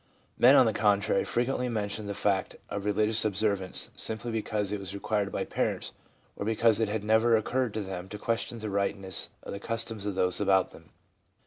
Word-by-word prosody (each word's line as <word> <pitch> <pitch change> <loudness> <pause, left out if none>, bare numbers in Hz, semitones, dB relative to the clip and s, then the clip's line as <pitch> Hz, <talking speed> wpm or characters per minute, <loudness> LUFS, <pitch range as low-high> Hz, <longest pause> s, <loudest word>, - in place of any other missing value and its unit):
Men, 130 +4 +7
on 130 - +7
the 110 - +1
contrary, 105 -1 +2
frequently 125 +5 -1
mention 105 -2 -3
the 100 - -4
fact 95 -2 0
of 100 0 -4
religious 105 +1 +3
observance, 100 -2 0
simply 110 +2 -2
because 105 -2 -2
it 105 - -2
was 95 0 -6
required 100 0 -1
by - - -2
parents, - - -2 0.4
or - - -5
because 110 0 +3
it 110 -2 +1
had 105 0 -2
never 110 +2 +4
occurred 125 +1 -1
to 110 - -1
them 95 -1 -6
to 105 - -6
question 115 +2 -2
the 110 -2 -5
rightness 100 -1 -1
of - - -7
the 100 - -5
customs 115 -1 -3
of 100 - -2
those 90 +1 +1
about 95 -2 +3
them. - - -16
105 Hz, 195 wpm, -28 LUFS, 100-110 Hz, 0.4 s, Men